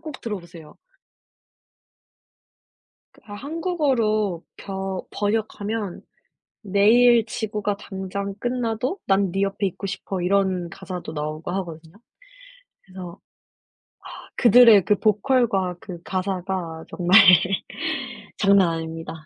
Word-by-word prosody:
꼭 305 -5 -9
들어보세요. 175 -7 -8 2.4
그 - - -21
한국어로 250 - -1
벼 190 -1 -5
번역하면 210 -1 -2 0.6
내일 225 +4 +4
지구가 210 -2 -3
당장 195 +1 -5
끝나도 245 - -2
난 195 -2 +2
니 195 +1 0
옆에 195 0 -1
있고 195 +2 -7
싶어 190 -1 -4
이런 185 -2 +1
가사도 180 0 -7
나오고 155 +3 -4
하거든요. 170 -2 -6 0.9
그래서 185 -1 -10 1.0
아 - - -10 0.2
그들의 235 -5 +7
그 210 - +2
보컬과 210 -4 +1
그 180 -4 -9
가사가 185 -3 -3
정말 180 +3 +5 1.2
장난 195 -3 +4
아닙니다. 165 0 -5
195 Hz, 215 characters per minute, -23 LUFS, 180-215 Hz, 2.4 s, 그들의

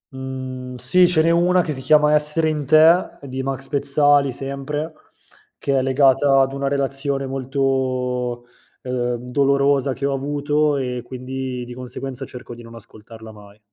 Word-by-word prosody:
Mhmm, 130 -1 -7
sì 175 +9 +3
ce 160 -3 +2
n'è 165 - +3
una 175 +2 +3
che 155 - -4
si 130 -2 -2
chiama 150 +2 +4
“Essere 150 +2 +2
in 150 -2 -2
te“ 160 +4 +6 0.2
di 130 -1 -5
Max 135 0 -4
Pezzali 140 -1 +3
sempre, 140 +4 -5 0.6
che 135 -1 0
è - - +1
legata 135 +1 +3
ad 135 0 0
una 140 0 -2
relazione 135 0 0
molto, 130 -2 -2 0.4
uhm, 125 -1 -2 0.2
dolorosa 140 0 +2
che 140 +2 -4
ho 140 - 0
avuto, 145 +2 0
e 125 -2 -3
quindi, 130 0 -6
di 120 - -9
conseguenza 130 +1 -6
cerco 125 -1 -10
di 120 - -11
non 115 0 -13
ascoltarla 110 0 -12
mai. 105 0 -16
135 Hz, 155 wpm, -20 LUFS, 125-145 Hz, 0.6 s, te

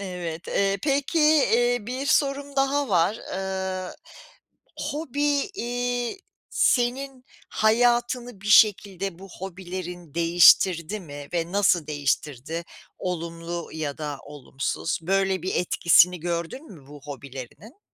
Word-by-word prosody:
Evet, 175 -4 -6
eee, 195 0 +1
peki, 285 +3 0 0.4
iii, 245 -2 +1
bir 260 +3 -4
sorum 280 -1 +1
daha 275 +1 +1
var, 185 +3 +2 0.2
ııı, 190 -1 -3 0.8
hobi, 290 +2 -1
iii, 245 +3 -2 0.3
senin 255 +1 +1 0.2
hayatını 240 0 +1
bir 205 - -10
şekilde 195 -3 +4
bu 195 0 -11
hobilerin 180 -3 -7
değiştirdi 170 +2 +5
mi 145 -4 -9
ve 170 0 -2
nasıl 185 -5 +3
değiştirdi, 145 +2 -2 0.3
olumlu 170 -1 -5
ya 155 -2 -4
da 145 -2 -4
olumsuz? 145 +2 -3
Böyle 190 +1 +1
bir 185 - -2
etkisini 175 0 +4
gördün 175 - -4
mü 145 -7 -15
bu 145 0 -12
hobilerinin? 140 - -10
190 Hz, 110 wpm, -25 LUFS, 165-245 Hz, 0.8 s, değiştirdi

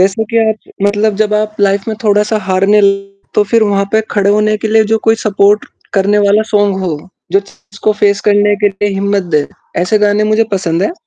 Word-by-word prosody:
जैसे 195 +4 +1
कि 230 - +1
आज 220 0 -5
मतलब 205 +1 +1
जब 210 0 -1
आप 215 0 -4
लाइफ़ 200 0 +1
में 220 - -3
थोड़ा-सा 210 +1 +1
हारने 195 +3 +3
लगे 195 0 0 0.2
तो 210 - +3
फ़िर 230 -1 +4
वहाँ 200 -1 +1
पे 220 - +3
खड़े 200 -1 +1
होने 215 +1 +2
के - - 0
लिए 220 0 +3
जो 225 - +1
कोई 225 - +5
सपोर्ट 205 0 +2 0.3
करने 200 +1 +2
वाला 210 +2 +3
सॉन्ग 205 -2 +2
हो, 170 - -2 0.4
जो 195 - +4
उसको 205 +1 -5
फेस 200 -1 +2
करने 205 0 +3
के 205 - +5
लिए 200 +1 -3
हिम्मत 200 0 0
दे, 145 - 0 0.3
ऐसे 180 +5 +1
गाने 210 0 +1
मुझे 225 +1 +3
पसंद 175 -2 -1
हैं। 270 - -1
205 Hz, 210 wpm, -13 LUFS, 195-215 Hz, 0.4 s, कोई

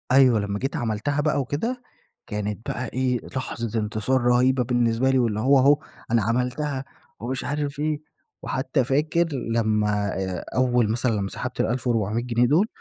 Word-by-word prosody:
أيوة 130 -4 +6
لما 100 0 -2
جيت 135 +7 -2
عملتها 120 +2 -1
بقى 150 -1 +1
وكده، 225 - -3 0.5
كانت 105 -1 -4
بقى 125 - -2
إيه 125 0 0 0.2
لحظة 115 -3 -2
انتصار 110 +4 0
رهيبة 125 +1 +3
بالنسبة 120 +1 +1
لي، 130 -1 +3
واللي 110 -4 +1
هو 135 +4 +5
اهو 140 +3 +5 0.3
أنا 115 -1 +4
عملتها 125 +5 -1 0.3
ومش 125 +3 -3
عارف 145 0 -3
إيه، 150 0 -1 0.4
وحتى 135 +1 0
فاكر 150 +6 +1
لما 105 -4 0
آآ 95 -2 -3
أول 125 -3 +2
مثلًا 120 +2 +1
لما 100 -3 -1
سحبت - - -5
ال1400 115 -2 0
جنيه 120 0 +2
دول، 165 - +3
125 Hz, 155 wpm, -24 LUFS, 110-135 Hz, 0.5 s, أيوة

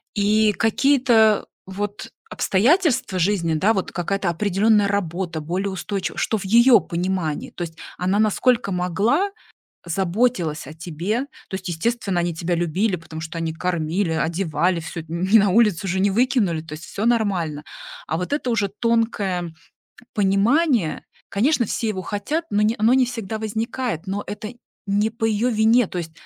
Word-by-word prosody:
И 210 +1 +3
какие-то 225 -1 +3 0.2
вот 205 +2 -5 0.2
обстоятельства 255 - +2
жизни, 170 -2 +1
да, 195 +8 +3
вот 190 - -2
какая-то 190 +1 -1
определённая 205 +3 +2
работа, 180 -4 -2
более 185 +6 -2
устойчи 190 -2 -3
что 220 - 0
в 195 - -7
её 235 +4 +6
понимании, 175 -3 -2
то - - -5
есть 165 -1 -8 0.2
она 185 +3 0
насколько 220 +1 +2
могла, 205 - +1 0.6
заботилась 180 - 0
о 155 - -9
тебе. 175 +7 -3 0.3
То - - -7
есть, 190 -1 -5
естественно, 195 +1 -1
они 170 -1 -1
тебя 170 +2 -1
любили, 180 +4 0
потому 160 -1 -9
что 165 +1 -6
они 165 -1 -2
кормили, 170 +1 -1
одевали, 170 +1 0
всё 165 +1 -6
т 160 - -19
не 185 +6 +3
на 205 -1 +4
улицу 200 -3 +3
же 190 +1 0
не 200 +1 +3
выкинули. 220 - +1
То 160 -1 -12
есть 155 - -9
всё 215 +3 -3
нормально. 185 -10 0 0.4
А - - -1
вот 180 - -4
это 275 -4 -2
уже 210 -4 +1
тонкое 200 -6 -1 0.6
понимание, 210 - +2 0.3
конечно, 240 +5 +2
все 225 +2 -2
его 190 -3 -3
хотят, 210 - -3
но 205 +1 +1
не 215 +2 +2
оно 225 +3 +4
не 260 -1 +4
всегда 225 -3 -5
возникает, 220 -3 -3
но 200 +2 -3
это 210 +3 -6 0.3
не 205 +2 +1
по 225 0 -3
её 225 +3 +1
вине. 225 +1 +4
То 180 - -6
есть 165 -2 -4
200 Hz, 160 wpm, -22 LUFS, 175-225 Hz, 0.6 s, её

